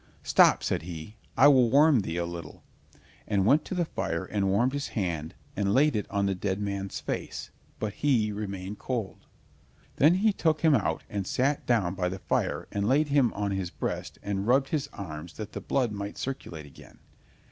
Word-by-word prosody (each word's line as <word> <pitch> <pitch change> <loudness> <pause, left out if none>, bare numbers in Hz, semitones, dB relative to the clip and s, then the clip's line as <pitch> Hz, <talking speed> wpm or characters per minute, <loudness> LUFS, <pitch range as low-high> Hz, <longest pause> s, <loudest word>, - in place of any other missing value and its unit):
"Stop," - - +5
said - - 0
he, 85 +4 -8 0.2
"I 140 - +8
will 130 -5 +6
warm 145 +1 +5
thee 85 -4 -3
a, 85 - 0
little," 85 -3 -8 0.6
and 100 -3 +1
went 145 +7 +4
to 190 - -4
the 175 -1 +1
fire 95 - -3
and 100 -2 0
warmed 120 +7 +2
his 145 0 -2
hand 85 -7 -3 0.2
and 100 +1 +1
laid 145 0 +4
it 105 - -2
on 100 0 0
the 100 - +1
dead 95 +1 -2
man's 100 -1 -3
face, - - -5 0.3
but 105 -2 -3
he 120 -7 +1
remained 100 -1 -5
cold. 120 -6 -4 0.7
Then 155 +5 +6
he 210 +3 +3
took 160 -4 +1
him 160 -2 +5
out, 80 - +1
and 100 -3 -4
sat 140 +3 0
down 105 -8 +2
by 90 -2 -1
the 95 - -5
fire - - -1
and 100 +2 0
laid 145 +3 +3
him 140 -4 +3
on 100 -1 -2
his 95 -2 -2
breast - - -4
and 100 0 -2
rubbed 135 +2 +3
his 145 -2 -1
arms 85 -3 -7
that 105 -1 -7
the - - -6
blood 125 -5 0
might 100 0 -5
circulate 85 - -5
again. 70 - -15
105 Hz, 195 wpm, -28 LUFS, 95-135 Hz, 0.7 s, I